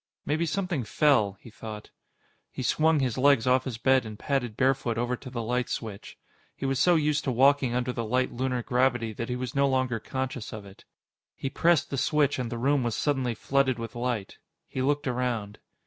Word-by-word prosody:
Maybe 160 +3 0
something 175 -5 -1
fell, 110 -5 +2
he 115 - -13
thought. 105 -1 -9 0.6
He 130 - -6
swung 155 +4 +3
his 130 -2 -1
legs 140 -3 +4
off 130 0 +3
his 125 -4 -4
bed 130 +2 +3
and 110 -2 -8
padded 125 -6 -2
barefoot 130 -3 +1
over 120 +1 0
to 130 - -10
the 120 -2 -4
light 125 +2 -1
switch. 105 -4 -6 0.4
He - - -5
was 135 -1 0
so 175 -1 +5
used 150 -1 +1
to 135 - +1
walking 135 0 +3
under 125 0 -1
the 120 - -3
light 125 +3 0
lunar 125 0 -2
gravity 120 -3 +1
that 115 +3 -5
he 125 - -1
was 125 +1 -4
no 140 -1 +3
longer 130 -3 0
conscious 130 0 -4
of 105 -2 -7
it. 95 0 -15 0.5
He 135 - -4
pressed 170 0 +2
the 140 - -1
switch, 145 -2 +2
and 125 -2 -3
the 120 - -3
room 140 +3 +2
was 120 -3 -1
suddenly 130 -5 0
flooded 135 +1 +1
with 115 +1 -6
light. 120 -5 -3 0.3
He 130 - -4
looked 145 +2 +1
around. 120 -5 -2
125 Hz, 205 wpm, -27 LUFS, 115-140 Hz, 0.6 s, so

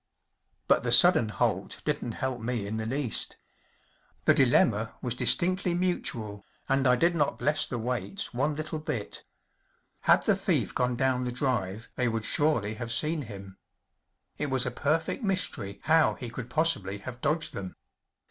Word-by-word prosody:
But - - +4
the - - -2
sudden 110 - +7
halt - - -1
didn’t 115 - -2
help 130 -3 -3
me 115 -2 -2
in 105 +2 -4
the 110 0 -3
least. 130 -1 -2 0.9
The - - +6
dilemma - - +2
was - - -2
distinctly 180 0 +2
mutual, 115 - -2 0.2
and 135 0 +2
I 125 - +5
did 170 +7 +2
not 145 -3 0
bless 150 +5 +1
the 125 - -4
waits 125 - -3
one 145 +5 0
little 155 +1 -4
bit. 145 -9 -5 0.8
Had - - +3
the - - +3
thief - - -1
gone 125 0 0
down 130 0 0
the 125 - -2
drive 110 -5 -2
they 125 - +1
would 115 -2 -1
surely 120 -9 +1
have 115 +1 -5
seen 155 +4 +1
him. 100 -5 -10 0.8
It 150 - -2
was 130 -2 +2
a - - -2
perfect 160 - -1
mystery 140 - -1
how 160 0 +3
he 120 -3 -7
could 120 +1 -7
possibly 120 - +1
have 120 +4 -9
dodged 155 +2 +2
them. 95 -2 -7
125 Hz, 165 wpm, -28 LUFS, 110-150 Hz, 0.9 s, sudden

